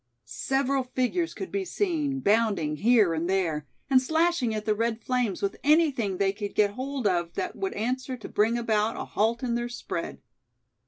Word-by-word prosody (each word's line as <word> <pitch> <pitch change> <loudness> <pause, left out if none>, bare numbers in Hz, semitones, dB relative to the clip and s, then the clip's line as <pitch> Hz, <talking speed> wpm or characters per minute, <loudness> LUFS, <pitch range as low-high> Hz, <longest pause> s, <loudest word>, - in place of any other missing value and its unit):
Several 270 0 0
figures 255 +7 -1
could 385 - -6
be 395 - -1
seen, 315 -9 -1
bounding 200 -9 +2
here 215 -4 +4
and 165 +2 -2
there, 165 -6 0 0.2
and 265 -2 +5
slashing 320 -3 +1
at 215 0 -4
the 215 - +2
red 230 +1 -1
flames 245 -8 -1
with 200 - -1
anything 280 - +3
they 195 0 +1
could 205 0 -6
get 205 -1 +3
hold 260 +2 -4
of 175 -3 +1
that 365 - -3
would 390 0 -3
answer 255 +3 -2
to 225 - -9
bring 225 +3 +2
about 220 -1 0
a - - -4
halt 230 +4 0
in 240 -2 0
their 240 0 -1
spread. 175 -7 -5
235 Hz, 180 wpm, -27 LUFS, 205-270 Hz, 0.2 s, and